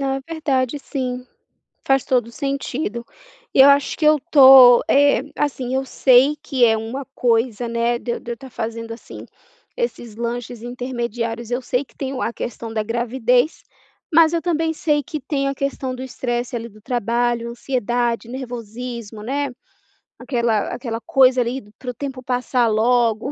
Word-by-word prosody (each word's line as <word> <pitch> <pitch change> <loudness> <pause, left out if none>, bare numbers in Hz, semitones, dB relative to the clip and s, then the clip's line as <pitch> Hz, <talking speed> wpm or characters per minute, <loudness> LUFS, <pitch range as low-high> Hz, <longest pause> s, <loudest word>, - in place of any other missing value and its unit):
Ah, 270 0 -1
verdade, 290 -4 -1
sim, 255 -3 -4 0.6
faz 270 -1 +3
todo 250 -3 +1
o - - -13
sentido. 275 -3 -3 0.5
Eu 270 +1 +8
acho 280 0 +2
que 315 - -2
eu 305 0 +5
tô, 260 -3 +9
eh, 285 -3 +4 0.2
assim, 260 -3 -2
eu 265 0 0
sei 265 +3 +4
que 265 -5 +2
é 225 -1 +4
uma 230 +5 -5
coisa, 235 -1 +1
né, 235 +1 0
de 235 - -4
eu - - -4
de 240 - -9
eu - - -1
estar 265 +2 -13
fazendo, 230 -1 -5
assim, 230 - -10 0.5
esses 360 - -4
lanches 235 0 -4
intermediários. 240 -2 -4
Eu 245 +1 -1
sei 250 +2 -1
que - - -28
tem 270 -1 -4
o 255 - -4
a 230 - -1
questão 230 -1 -6
da 220 - -1
gravidez, 245 +4 0 0.5
mas 320 0 +6
eu 335 - 0
também 325 -2 0
sei 300 -2 0
que 305 +3 -5
tem 275 +1 -1
a 275 - -2
questão 270 -1 -3
do 255 - -7
estresse, 245 -1 -3
ali, 230 0 -5
do 215 0 -18
trabalho, 235 0 -1
ansiedade, 240 -1 -2
nervosismo, 235 -3 -7
né. 280 +4 -2 0.7
Aquela 235 -5 -1
aquela 230 -3 -5
coisa, 255 +2 +4
ali, 245 +2 -3 0.2
para 250 -1 -5
o - - -14
tempo 265 -1 -6
passar 250 -1 0
logo. 230 +2 +2
245 Hz, 165 wpm, -21 LUFS, 235-270 Hz, 0.7 s, tô